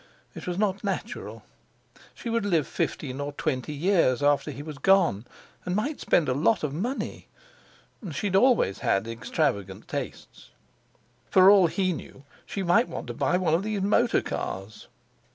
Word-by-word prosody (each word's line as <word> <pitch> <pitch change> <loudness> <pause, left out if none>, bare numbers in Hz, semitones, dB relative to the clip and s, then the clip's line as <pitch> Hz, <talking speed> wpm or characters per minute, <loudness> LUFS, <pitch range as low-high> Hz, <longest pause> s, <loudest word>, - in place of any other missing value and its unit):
It - - -9
was 180 0 -2
not 200 -1 0
natural. 200 +3 -4 0.7
She - - -9
would 230 -1 0
live 170 -7 +1
fifteen 135 -2 -3
or 145 0 -4
twenty 130 -1 -2
years 150 -5 +2
after 145 +1 +2
he 145 0 -7
was 150 -3 -8
gone, 170 - +3 0.4
and 180 - -2
might 275 +9 -2
spend 165 - +2
a 130 - +1
lot 165 - +2
of 145 -2 -2
money; 235 - -4 0.8
she 145 - -4
had 190 -2 0
always 220 - +3
had 95 +3 0
extravagant 115 - -2
tastes. - - -7 0.8
For 190 +1 +7
all 195 -4 +6
he 185 +1 0
knew 140 -3 -10 0.2
she 195 - -3
might 195 +8 +3
want - - -6
to - - -3
buy 180 - +1
one 175 -4 +1
of 165 - +3
these 210 -1 -2
motor 230 +4 +2
cars. 95 +3 -5
175 Hz, 165 wpm, -26 LUFS, 140-200 Hz, 0.8 s, For